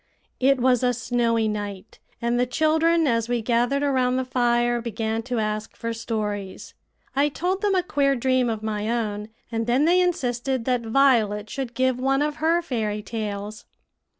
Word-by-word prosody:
It 270 +1 +3
was 250 -1 +3
a 250 -1 +2
snowy 230 -1 +1
night, 205 -1 -5 0.2
and 235 +1 0
the 250 - +2
children, 320 +4 +2
as 230 -3 +1
we 240 -2 0
gathered 245 +5 +1
around 255 -3 +2
the 260 - -1
fire, 240 -1 +1
began 225 -1 -2
to 245 +1 -4
ask 215 -1 -2
for 230 0 -4
stories. 210 -4 -4 0.4
I 285 +2 +3
told 365 +6 -2
them 405 -2 +2
a 365 - +2
queer 280 -5 +1
dream 255 0 +1
of 220 -1 -3
my 215 0 -2
own, 215 -3 -2 0.2
and 225 0 -2
then 255 +5 +3
they 360 +2 +4
insisted 260 -7 -1
that 250 -2 +1
Violet 220 -4 +2
should 260 -3 -5
give 260 -1 +1
one 270 +2 +2
of 300 0 -2
her 330 +2 +2
fairy 215 -7 -2
tales. 210 -1 -5
240 Hz, 175 wpm, -24 LUFS, 220-270 Hz, 0.4 s, they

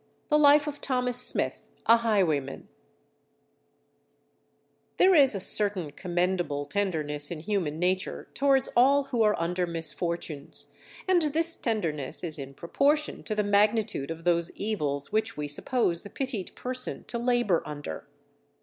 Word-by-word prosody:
The 300 -1 +3
Life 295 0 +5
of 295 -1 -5
THOMAS 250 -2 0
SMITH, - - +1 0.2
a 230 - +6
Highwayman 180 - -1 2.3
There 375 +1 +5
is 275 - +6
a - - -2
certain 195 -5 +4
commendable 175 -3 -2
tenderness 150 -5 -1
in 165 -3 -6
human 175 -6 -2
nature 185 +2 -2
towards 270 -1 +2
all 275 +4 +4
who 260 -4 -2
are 210 -1 +2
under 175 +2 -1
misfortunes, 165 -2 -3 0.4
and 370 -2 +3
this 325 +2 +3
tenderness 165 - -3
is 160 -3 -5
in 135 0 -8
proportion 285 - 0
to 215 - -3
the 210 - +1
magnitude 205 -6 +1
of 165 0 -7
those 170 -1 +1
evils 150 -10 -3
which 220 -1 -1
we 150 0 -3
suppose 170 - -1
the 205 - -11
pitied 255 -8 -5
person 255 0 -3
to 235 - -5
labour 240 -7 +1
under. 145 - -8
200 Hz, 140 wpm, -27 LUFS, 165-250 Hz, 2.3 s, a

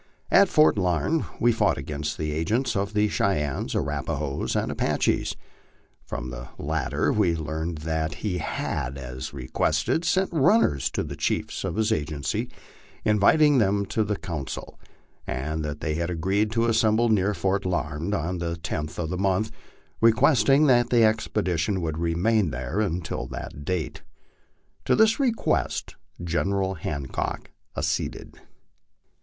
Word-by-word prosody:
At 200 -1 +6
Fort 155 -8 +4
Larned 90 - +1
we 120 - +4
found 115 - +2
the 75 +2 -3
agent 110 - 0
of 100 +1 -2
the 105 0 +3
Cheyennes, 75 -10 -1
Arapahoes, 70 -1 -2
and - - 0
Apaches; - - 0 0.7
from 60 +1 -5
the - - -7
lat 80 +1 -2
ter - - +1
we 85 - +2
learned 80 +1 -3
that 80 -1 -1
he 90 -4 -1
had, 65 -3 -3
as 65 -1 -6
requested, 70 - 0
sent 185 +2 +1
runners 155 - +3
to - - -2
the - - -6
chiefs - - -2
of - - -2
his 110 +1 +1
agency 75 -5 -2 0.6
inviting 135 +8 +5
them 100 -1 +2
to 110 +3 0
the 105 0 -1
council, 80 -7 -6 0.5
and 75 +5 -2
that 75 0 -5
they 75 - -1
had 85 +2 -2
agreed 95 +5 0
to 115 0 +2
assemble 115 0 +3
near 105 -1 +2
Fort 95 +3 0
Larned 85 +1 -1
on 90 0 -2
the 85 -1 -2
10th 80 -2 -4
of 80 -1 -3
the 90 - -2
month, 100 +3 +1 0.5
requesting 135 +4 +5
that 120 -3 +4
the 120 -2 +4
expedition 105 -4 +1
would 80 -2 -3
remain 90 +4 +2
there 65 - -3
until 90 -5 -2
that 70 - -7
date. 90 -3 -2 0.8
To - - +3
this 220 +2 +4
request 245 -5 0 0.3
General 95 +3 0
Hancock 70 -6 -4 0.3
acceded. - - -3
90 Hz, 140 wpm, -25 LUFS, 80-110 Hz, 0.8 s, At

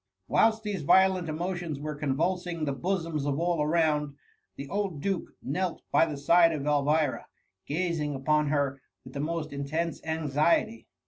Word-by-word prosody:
^ - - -61 0.2
Whilst 220 0 +3
these 205 -5 -3
violent 185 +2 +4
emotions 170 -2 -3
were 150 +1 -4
convuls* 160 +6 -1
ing 170 -3 -3
the 140 - -1
bosoms 165 -2 -2
of 140 +1 0
all 170 -2 +1
around, 150 -2 +1 0.4
the 140 - -7
old 195 -2 -2
duke 190 +2 -3
knelt 180 +6 -2
by 165 - +4
the 150 -3 -5
side 165 +4 +5
of 145 -2 -4
Elvira, 150 0 +1 0.4
gazing 155 -2 -1
upon 150 +2 +1
her 140 -2 0 0.2
with 130 - -12
the 140 - -5
most 155 0 -3
intense 155 +4 -3
anxkty. 160 +7 0
155 Hz, 160 wpm, -28 LUFS, 145-175 Hz, 0.4 s, side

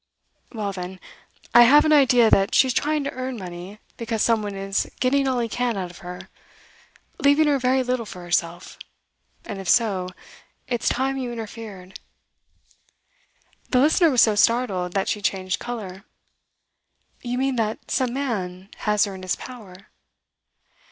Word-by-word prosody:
'Well 210 -4 -3
then, 185 0 -7 0.5
I 240 - +9
have 285 +6 +7
an 310 - +4
idea 245 -6 +5
that 195 +1 +3
she's 260 -2 +4
trying 300 +3 0
to 280 - -3
earn 255 -1 -5
money 180 +1 -8 0.2
because 230 -2 -2
some 230 -2 +2
one 205 -1 -5
is 195 0 -2
getting 270 +2 +2
all 260 -1 0
he 235 -1 0
can 240 -1 -2
out 180 -2 -4
of 175 - -14
her 180 +1 -9 0.9
leaving 290 0 +4
her 285 -2 +2
very 260 +1 +2
little 250 -3 -2
for 180 -3 -9
herself; 175 0 -2 0.7
and 200 - -6
if 185 - -5
so, 195 -6 +2 0.6
it's 240 -3 0
time 270 +1 -1
you 250 -2 -4
interfered.' 215 -5 -8 1.7
The 250 - +3
listener 315 +5 +4
was 255 -5 +5
so 220 - +3
startled 205 -5 +1
that 195 -1 0
she 210 - -1
changed 185 -2 -1
colour. 200 -6 -7 1.2
'You 245 0 -3
mean 265 0 0
that 220 -1 -3
some 255 -2 +1
man 195 -8 -4
has 210 -1 +1
her 200 - -6
in 190 - -9
his 185 0 -1
power? 205 -6 -12
225 Hz, 160 wpm, -23 LUFS, 190-255 Hz, 1.7 s, I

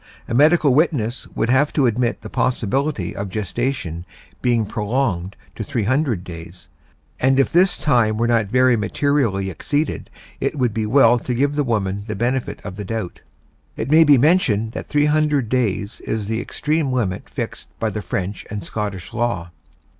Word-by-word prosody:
A - - -4
medical 150 +1 +5
witness 130 -6 +1
would 115 - +1
have 140 +3 +3
to 140 - +3
admit 120 0 0
the - - -8
possibility 125 - -1
of 100 0 -4
gestation 105 -4 -3 0.4
being 120 -3 +2
prolonged 105 -4 -1 0.2
to 110 - -5
300 120 - 0
days, 85 0 -10 0.5
and 130 +1 +3
if 135 - +2
this 180 +2 +4
time 120 -7 +2
were 115 - +1
not 115 -3 +2
very 125 +3 +4
materially 110 -4 0
exceeded 145 - -2 0.3
it - - -2
would 125 -5 +1
be 110 -1 -1
well 120 0 +5
to 125 +1 -3
give 140 +3 +1
the 145 0 +1
woman 100 -5 -1
the 105 - -3
benefit 120 +4 -2
of 90 - -7
the 105 - -4
doubt. 110 -3 -5 0.6
It 120 +6 -3
may 160 +1 +7
be 145 -3 +6
mentioned 120 - +3
that - - -6
300 150 -3 +2
days 110 -4 -1
is 110 -2 -3
the 110 +1 -1
extreme 150 -2 -1
limit 110 -8 -2
fixed - - -5
by 110 -1 0
the 105 - -4
French 95 0 -4
and 105 -4 -5
Scottish 100 -2 -5
law. 105 -8 -2
120 Hz, 170 wpm, -21 LUFS, 105-140 Hz, 0.6 s, may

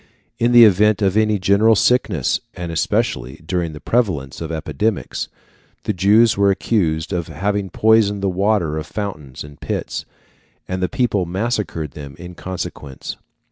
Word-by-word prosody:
In 120 +1 +2
the 120 -1 +9
event 105 +1 +4
of 95 0 +2
any 110 -1 +3
general 100 +4 +4
sickness, 105 - +2 0.2
and 85 -1 -5
especially 65 -5 -1
during 85 -2 -2
the 75 - -8
prevalence 85 - -1
of 80 -1 -4
epidemics, 100 +7 -2 0.6
the 105 - -1
Jews 105 +5 +4
were 100 0 +3
accused 90 -4 0
of 85 -2 -2
having 100 +5 -2
poisoned 105 0 +3
the - - +2
water 95 -4 +1
of 80 - -7
fountains 90 -12 -6
and 75 0 -13
pits, - - -3 0.6
and 95 0 -3
the 90 - 0
people 115 -9 0
massacred 95 - -2
them 70 -2 -9
in 90 +1 -9
consequence. 85 -7 -6
95 Hz, 150 wpm, -20 LUFS, 80-105 Hz, 0.6 s, the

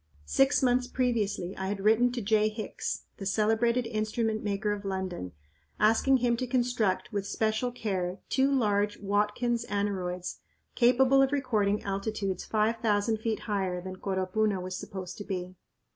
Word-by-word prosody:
Six 270 - +3
months 250 0 +3
previously 210 -8 -1
I 190 - -3
had 200 0 -2
written 225 +4 +4
to 240 -3 -3
J. 215 +1 +3
Hicks, 215 -1 -4
the 195 - -6
celebrated 225 +4 +2
instrument 220 0 -1
maker 205 0 -1
of 205 0 -3
London, 190 - -4 0.5
asking 225 +5 +4
him 240 -1 +2
to 255 - -2
construct, 240 -5 0
with 200 -1 -2
special 220 +4 0
care, 190 -6 -2
two 270 +1 +2
large 210 -5 +1
"Watkins" 210 +4 0
aneroids 185 -3 -2 0.3
capable 260 +2 +5
of 270 0 +3
recording 215 -8 +1
altitudes 195 -1 -2
five 220 +1 +1
thousand 220 0 +1
feet 220 0 -2
higher 190 -4 -1
than 185 +1 -7
Coropuna 190 +2 0
was 185 0 -5
supposed 185 0 -7
to - - -4
be. 185 -2 -4
210 Hz, 150 wpm, -29 LUFS, 195-235 Hz, 0.5 s, capable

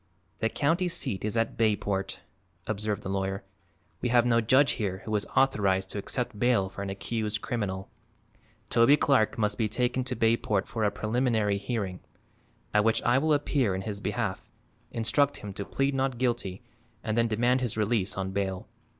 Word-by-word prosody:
"The 110 - +1
county 165 +9 +1
seat 130 - -2
is 110 +2 -1
at 115 - 0
Bayport," 100 -4 0 0.4
observed 105 0 -2
the - - -4
lawyer. 95 0 -2 0.6
"We 125 - 0
have 120 0 +4
no 115 -1 +3
judge 130 +5 +4
here 95 -1 -2
who 110 -1 -1
is 105 - 0
authorized 95 -8 +2
to 105 - -3
accept 120 0 -3
bail 120 -6 +2
for 100 - -8
an 100 - -3
accused 105 +2 -2
criminal. 95 -5 -3 0.8
Toby 120 +5 +6
Clark 135 -8 +2
must 105 0 0
be 110 -2 +1
taken 125 +3 0
to 125 0 -3
Bayport 110 -4 +1
for 115 - -3
a 105 - +4
preliminary 110 -1 0
hearing, 100 -3 -3 0.7
at 105 0 +4
which 115 +1 +2
I 120 +2 +4
will 155 +2 +1
appear 140 -8 +1
in 95 - -3
his 105 -1 -4
behalf, 105 -1 -3 0.4
instruct 120 +5 +1
him 100 -1 -7
to 100 - -5
plead 135 +6 0
not 135 -2 0
guilty 120 -5 -1 0.4
and 110 - -1
then 115 0 +3
demand 120 +4 +2
his 120 -4 -2
release 105 -3 0
on 95 0 -2
bail. 95 -1 -2
110 Hz, 175 wpm, -28 LUFS, 100-125 Hz, 0.8 s, Toby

